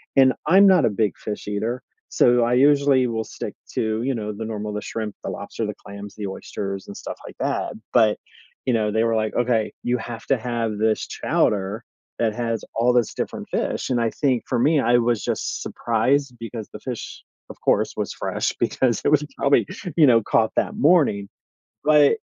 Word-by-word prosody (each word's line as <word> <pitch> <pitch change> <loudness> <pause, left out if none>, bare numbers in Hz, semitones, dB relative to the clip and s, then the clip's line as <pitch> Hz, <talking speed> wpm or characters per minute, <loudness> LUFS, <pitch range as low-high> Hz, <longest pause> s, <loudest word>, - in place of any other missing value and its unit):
and 130 -1 +6
I'm 195 +5 +7
not 185 -8 +5
a - - +3
big 105 0 0
fish 105 -1 -6
eater, 110 +5 -2 0.3
so, 120 0 +4
I 120 - +1
usually 140 0 +4
will 110 -1 -2
stick - - -6 0.2
to, 110 0 -1
you 135 +1 0
know, 105 -2 -3
the 110 +2 -6
normal 105 -1 -4
the 105 - -3
shrimp, 110 -2 -4
the - - -2
lobster, - - -4
the - - -3
clams, 100 0 -9
the 105 -2 -4
oysters, 95 0 -5
and, 100 - -8
stuff - - -7
like - - -10
that, - - -1 0.2
but, 110 -3 +4 0.5
you 130 - +1
know, 110 -2 +1
they 110 +2 +2
were 115 -1 +1
like, 110 -1 0
"Okay, 120 -3 +1
you 125 +1 +1
have 115 0 -7
to 135 - +2
have 115 -2 -2
this 110 +1 +1
chowder 100 +2 0 0.4
that 115 -2 +1
has 115 -2 -2
all 120 +2 +3
this 120 -2 +2
different - - -4
fish," - - -2
and 125 -2 +1
I 115 - +1
think, 130 -5 0
for - - 0
me, 150 +5 +4
I 120 -1 +4
was 115 -4 +1
just - - -2
surprised, 125 +4 0
because 115 -2 -7
the 105 - -7
fish, 125 0 -7 0.3
of - - -10
course, - - +2
was - - -2
fresh, - - -2
because 125 -3 +1
it - - +4
was 150 0 +3
probably, 140 -6 +3 0.3
you 155 -3 +7
know, 115 -3 +6
caught 110 +1 +2
that - - 0
morning, 145 - +3 0.6
but 150 +6 +5
115 Hz, 200 wpm, -23 LUFS, 110-130 Hz, 0.6 s, I'm